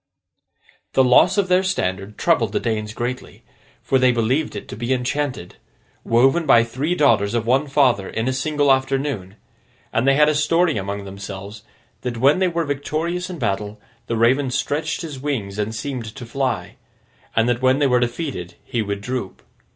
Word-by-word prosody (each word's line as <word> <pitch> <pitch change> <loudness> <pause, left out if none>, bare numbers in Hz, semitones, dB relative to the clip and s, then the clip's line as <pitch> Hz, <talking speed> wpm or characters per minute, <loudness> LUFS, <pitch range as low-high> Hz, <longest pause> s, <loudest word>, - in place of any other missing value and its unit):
The 130 - +5
loss 130 +10 +5
of 200 -2 +2
their 180 0 +4
standard 100 - -2
troubled 120 -12 +1
the - - +1
Danes 110 -2 -2
greatly, 120 +3 -5 0.4
for 135 - +2
they 130 0 +5
believed 125 +4 0
it 100 - -7
to - - -6
be 120 +4 -3
enchanted—woven 130 - -1
by 115 -4 +6
the 115 - -9
three 145 +9 -1
daughters 120 - +3
of 115 -1 0
one 135 +5 +2
father 130 -8 +2
in 115 +2 -2
a 130 - +1
single 145 +1 +1
afternoon—and 130 -3 -4
they 135 - +5
had 150 +1 +5
a 155 - +3
story 160 +2 +2
among 100 +1 -4
themselves 100 +1 -8 0.4
that 125 -2 -4
when 140 +8 +4
they 190 - +3
were 170 -1 -1
victorious 160 +6 -2
in 180 - -6
battle, 105 -4 -2 0.3
the 115 - -1
Raven 130 +4 +3
stretched 150 +5 -2
his 150 -5 -6
wings 110 -8 -3
and 110 +2 -2
seemed 115 -3 -5
to 130 -3 -8
fly; 130 +3 -3 0.6
and 115 +1 +3
that 120 0 0
when 130 +1 +4
they 145 - +2
were 125 -2 +3
defeated, 120 - -3
he 120 - -2
would 100 -1 -3
droop. 125 -4 -5
125 Hz, 175 wpm, -21 LUFS, 110-145 Hz, 0.6 s, by